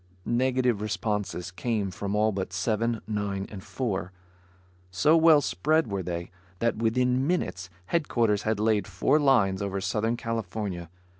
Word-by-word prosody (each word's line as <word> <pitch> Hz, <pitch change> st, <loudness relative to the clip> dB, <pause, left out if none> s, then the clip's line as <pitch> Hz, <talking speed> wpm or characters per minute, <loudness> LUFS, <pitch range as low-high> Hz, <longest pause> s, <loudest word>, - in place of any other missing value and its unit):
Negative 125 Hz, -2 st, +1 dB
responses 105 Hz, -4 st, -2 dB
came 105 Hz, 0 st, -2 dB
from 100 Hz, +2 st, -3 dB
all 110 Hz, +1 st, +3 dB
but 95 Hz, -2 st, -3 dB
Seven, 110 Hz, +4 st, 0 dB
Nine 100 Hz, -2 st, -2 dB
and 95 Hz, -3 st, -8 dB
Four. 95 Hz, -8 st, -3 dB, 0.8 s
So 145 Hz, -, +3 dB
well 160 Hz, -2 st, +6 dB
spread 155 Hz, -, +1 dB
were 100 Hz, -1 st, -1 dB
they, 85 Hz, 0 st, -5 dB, 0.3 s
that 115 Hz, +3 st, 0 dB
within 125 Hz, +4 st, +1 dB
minutes 95 Hz, -, -1 dB, 0.2 s
headquarters 115 Hz, -, +1 dB
had 110 Hz, -1 st, -1 dB
laid 110 Hz, -1 st, +2 dB
four 100 Hz, +10 st, +2 dB
lines 110 Hz, -10 st, +3 dB
over 100 Hz, -1 st, -2 dB
Southern 105 Hz, +5 st, -1 dB
California. 105 Hz, -6 st, -4 dB
105 Hz, 140 wpm, -27 LUFS, 95-120 Hz, 0.8 s, well